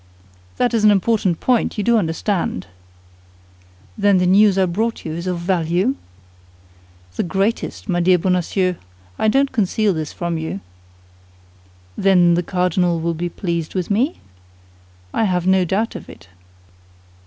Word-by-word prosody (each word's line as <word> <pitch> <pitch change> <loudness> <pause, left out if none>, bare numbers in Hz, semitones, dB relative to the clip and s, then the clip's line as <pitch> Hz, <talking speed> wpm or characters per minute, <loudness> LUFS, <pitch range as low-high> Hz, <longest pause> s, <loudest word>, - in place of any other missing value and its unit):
"That 245 -1 +1
is 225 -2 +1
an 210 - +7
important 200 -3 +1
point, 250 -3 +1
do 210 - -2
you 235 0 +4
understand?" 170 - -1 1.3
"Then 200 -2 +3
the 180 - +2
news 195 +2 +5
I 190 - +4
brought 220 +6 -2
you 155 - -4
is 170 +3 -5
of 180 -1 -1
value?" 175 +5 0 1.2
"The - - +1
greatest, 195 +8 -2
my 180 -3 0
dear 180 +1 +4
Bonacieux; 180 0 0 0.4
I - - +2
don't 270 +5 +2
conceal 210 -1 +1
this 155 -2 -4
from 170 -2 -3
you." 160 -10 -4 1.4
"Then 180 -3 +4
the 175 - +2
cardinal 180 -1 0
will 170 +1 -1
be 175 +2 -3
pleased 170 -2 -4
with 185 +1 -2
me?" 250 - 0 0.9
"I 225 - +1
have 180 -3 0
no 190 -1 +3
doubt 205 +6 -1
of - - -9
it." 85 +2 -14
185 Hz, 145 wpm, -19 LUFS, 170-210 Hz, 1.4 s, an